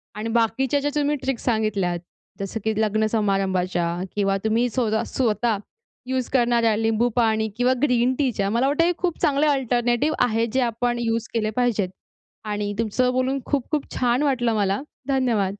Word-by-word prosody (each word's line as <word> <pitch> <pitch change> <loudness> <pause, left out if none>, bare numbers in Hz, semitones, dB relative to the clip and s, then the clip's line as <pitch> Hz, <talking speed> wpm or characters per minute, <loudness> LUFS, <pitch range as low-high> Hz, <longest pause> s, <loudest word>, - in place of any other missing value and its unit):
आणि 215 +2 -4
बाकीच्या 235 +5 +1
ज्या 290 +1 -1
तुम्ही 295 0 +1
ट्रिक्स 265 -3 -2
सांगितल्यात, 210 -7 0 0.4
जसं 200 +3 -4
की 220 - +1
लग्न 215 0 +1
समारंभाच्या 190 -5 0 0.3
किंवा 195 -1 +1
तुम्ही 225 +3 +2
स्वत 230 -2 -1
स्वतः 225 -2 0 0.5
युज 260 -1 -1
करणाऱ्या 235 -3 +3
लिंबू 225 +2 +1
पाणी 220 -2 +2
किंवा 250 +1 +3
ग्रीन-टीच्या 250 -5 +1
मला 235 +5 +2
वाटतं 295 +4 +2
हे 350 - +3
खूप 360 -3 -2
चांगले 295 -2 +2
अल्टरनेटिव्ह 250 +1 +1
आहे 230 -1 +1
जे 260 - +2
आपण 240 0 0
युज 230 -1 -1
केले 220 -2 0
पाहिजेत. 235 -6 +1 0.6
आणि 205 -1 -2
तुमचं 240 +3 +1
बोलून 260 +2 0
खूप-खूप 285 +1 -2
छान 250 +2 +1
वाटलं 240 -5 +1
मला 200 0 0 0.3
धन्यवाद. 230 -8 0
235 Hz, 155 wpm, -23 LUFS, 215-255 Hz, 0.6 s, करणाऱ्या